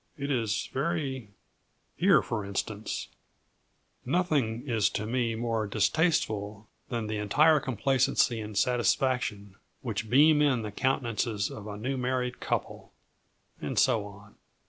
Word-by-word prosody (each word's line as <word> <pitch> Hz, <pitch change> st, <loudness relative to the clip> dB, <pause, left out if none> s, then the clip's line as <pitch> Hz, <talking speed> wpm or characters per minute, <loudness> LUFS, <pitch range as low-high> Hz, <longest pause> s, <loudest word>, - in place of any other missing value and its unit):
It 140 Hz, 0 st, -3 dB
is 115 Hz, -5 st, 0 dB
very 135 Hz, -6 st, -2 dB, 0.7 s
here, 175 Hz, -, +4 dB
for 105 Hz, +1 st, -3 dB
instance 100 Hz, +2 st, -4 dB, 0.9 s
'Nothing 140 Hz, -6 st, 0 dB
is 115 Hz, -4 st, +2 dB
to 105 Hz, -, -3 dB
me 115 Hz, 0 st, 0 dB
more 115 Hz, -2 st, -1 dB
distasteful 105 Hz, -, 0 dB, 0.2 s
than 115 Hz, -3 st, -2 dB
the 110 Hz, 0 st, -3 dB
entire 150 Hz, +10 st, +4 dB
complacency 130 Hz, -2 st, +1 dB
and 105 Hz, -1 st, -6 dB
satisfaction 115 Hz, -3 st, 0 dB, 0.2 s
which 110 Hz, -4 st, -4 dB
beam 150 Hz, +4 st, +6 dB
in 130 Hz, -6 st, +2 dB
the 105 Hz, -, -5 dB
countenances 115 Hz, -4 st, -1 dB
of 105 Hz, 0 st, -8 dB
a 105 Hz, -1 st, -6 dB
new 130 Hz, +5 st, -2 dB
married 125 Hz, 0 st, -2 dB
couple' -, -, -3 dB, 0.7 s
and -, -, -4 dB
so 115 Hz, -5 st, +3 dB
on. 100 Hz, +1 st, -14 dB
120 Hz, 125 wpm, -28 LUFS, 105-135 Hz, 0.9 s, beam